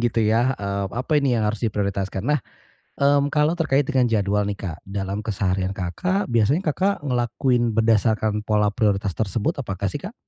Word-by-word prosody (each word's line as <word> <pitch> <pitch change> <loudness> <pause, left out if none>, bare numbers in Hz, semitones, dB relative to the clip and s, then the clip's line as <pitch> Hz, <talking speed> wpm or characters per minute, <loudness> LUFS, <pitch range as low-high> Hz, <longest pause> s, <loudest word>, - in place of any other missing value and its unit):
gitu 120 -1 +1
ya, 115 +4 +3
eee, 100 -1 -2
apa 130 +6 -3
ini 130 -4 +2
yang 110 - +1
harus 110 0 -3
diprioritaskan. 100 -2 -2
Nah, 150 +2 +2 0.6
mmm, 140 0 +3
kalau 155 +2 +2
terkait 145 -4 +2
dengan 130 -2 +2
jadwal 105 -2 +1
nih 100 - -4
Kak, 85 -4 -5
dalam 100 0 -4
keseharian 95 -3 -1
Kakak 180 - -1
biasanya 120 - +3
Kakak 190 0 -1
ngelakuin 120 -1 +1
berdasarkan 110 -1 +2
pola 105 -1 +2
prioritas 100 -3 0
tersebut, 110 - -1
apakah 100 -5 -3
sih 145 - -4
Kak? 195 +8 -8
110 Hz, 170 wpm, -23 LUFS, 100-135 Hz, 0.6 s, ya